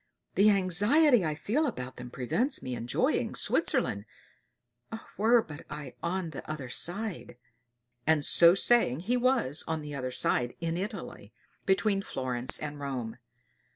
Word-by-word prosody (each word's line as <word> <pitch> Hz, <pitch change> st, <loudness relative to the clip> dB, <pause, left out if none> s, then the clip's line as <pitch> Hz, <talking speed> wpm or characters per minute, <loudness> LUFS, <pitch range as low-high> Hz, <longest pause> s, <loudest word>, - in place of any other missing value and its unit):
The 205 Hz, +2 st, +5 dB
anxiety 205 Hz, -, +3 dB
I 155 Hz, -2 st, -2 dB
feel 255 Hz, -, -1 dB
about 130 Hz, -, -6 dB
them 125 Hz, 0 st, -8 dB
prevents 215 Hz, -, -1 dB
me 130 Hz, -, -4 dB
enjoying 120 Hz, 0 st, -1 dB
Switzerland. 100 Hz, +1 st, +1 dB, 1.1 s
Were 225 Hz, +2 st, +3 dB, 0.2 s
I 145 Hz, -4 st, -8 dB
but -, -, -37 dB
on 180 Hz, -2 st, -3 dB
the 145 Hz, -, -7 dB
other 145 Hz, -5 st, -5 dB
side!" 185 Hz, -, -3 dB, 0.7 s
And 160 Hz, -2 st, +3 dB
so 170 Hz, +1 st, +7 dB
saying 195 Hz, -, +3 dB
he 230 Hz, +7 st, -1 dB
was 245 Hz, -, +1 dB
on 160 Hz, -1 st, -2 dB
the 150 Hz, 0 st, -7 dB
other 130 Hz, -2 st, -4 dB
side 125 Hz, -1 st, 0 dB
in 165 Hz, -1 st, -2 dB
Italy, 180 Hz, -, -7 dB, 0.3 s
between 195 Hz, +1 st, +2 dB
Florence 130 Hz, -6 st, -2 dB
and 145 Hz, -1 st, -6 dB
Rome. 125 Hz, -5 st, -5 dB
165 Hz, 140 wpm, -29 LUFS, 130-210 Hz, 1.1 s, so